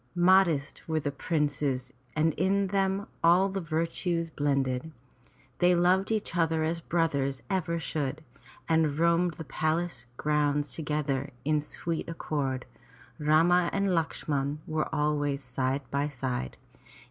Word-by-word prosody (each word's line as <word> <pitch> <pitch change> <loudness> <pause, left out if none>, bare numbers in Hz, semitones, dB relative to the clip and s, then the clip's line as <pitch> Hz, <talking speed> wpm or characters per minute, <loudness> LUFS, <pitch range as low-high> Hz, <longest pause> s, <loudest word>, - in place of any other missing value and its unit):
Modest 175 -5 +3
were 160 -1 +1
the 145 -1 -2
princes 140 -4 -1 0.2
and 155 +1 +2
in 195 +3 +2
them 195 0 +1 0.2
all 180 +4 +5
the 195 0 -3
virtues 165 +1 -1
blended. 140 0 0 0.7
They 180 0 +5
loved 185 +4 +3
each 215 -5 -1
other 165 -2 +2
as 165 +2 -1
brothers 145 -6 0
ever 170 -3 0
should, 155 -2 -3 0.4
and 160 -3 +2
roamed 170 0 +3
the 160 - -6
palace 155 -3 -2
grounds 145 -2 +1
together 145 -2 -1 0.2
in 150 0 +2
sweet 165 +3 -4
accord, 140 -5 -2 0.5
Rama 165 +4 +4
and 200 0 +1
Lakshman 150 -4 -1 0.3
always 145 -2 0
side 130 +2 -1
by 140 +1 0
side. 125 - -3
155 Hz, 125 wpm, -29 LUFS, 145-170 Hz, 0.7 s, all